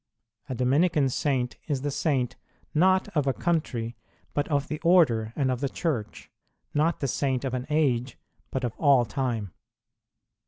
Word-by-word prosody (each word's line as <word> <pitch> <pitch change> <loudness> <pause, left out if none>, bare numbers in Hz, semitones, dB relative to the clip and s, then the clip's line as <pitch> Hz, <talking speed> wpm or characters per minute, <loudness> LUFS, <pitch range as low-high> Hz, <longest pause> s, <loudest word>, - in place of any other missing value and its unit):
A 130 - -2
Dominican 140 +3 +2
saint 130 -2 -1
is 140 -4 -1
the 145 +1 -2
saint, 135 -4 0 0.4
not 185 +4 +4
of 145 -3 +1
a 135 - +3
country, 125 -10 -1 0.4
but 145 - 0
of 145 -2 0
the 155 - -4
Order 145 -12 +4
and 135 -3 +1
of 125 - -2
the 140 - 0
Church; 135 - -3 0.4
not 160 +3 +1
the 140 - +1
Saint 135 0 -1
of 130 - -2
an 125 0 -3
age, 130 -5 +1 0.3
but 130 - -3
of 120 -3 -1
all 140 -5 +5
time. 115 -4 -2
135 Hz, 160 wpm, -27 LUFS, 125-150 Hz, 0.4 s, all